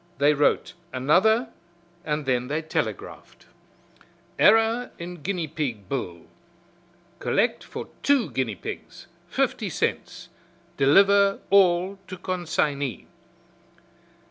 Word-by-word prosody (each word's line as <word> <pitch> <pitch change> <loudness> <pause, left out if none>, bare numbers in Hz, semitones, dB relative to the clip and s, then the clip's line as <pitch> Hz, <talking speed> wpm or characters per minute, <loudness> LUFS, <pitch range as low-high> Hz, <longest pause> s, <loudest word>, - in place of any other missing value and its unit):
They 145 +2 +4
wrote 145 0 +1 0.2
another 200 - +3 0.5
and 150 -1 -2
then 125 -1 0
they 150 +4 -2
telegraphed: 155 - -5 0.9
"Error 225 +2 +4
in 175 -1 -8
guinea 175 -1 -2
pig 135 - -4
bill. 90 -9 -4 1.0
Collect - - 0
for - - -7
two 280 -5 +2
guinea 120 -6 -2
pigs, - - -8 0.2
fifty - - -1
cents. - - -3 0.5
Deliver 195 +7 +4
all 190 0 +3
to 185 - -7
consignee." 155 - -2
160 Hz, 95 wpm, -25 LUFS, 140-195 Hz, 1.0 s, They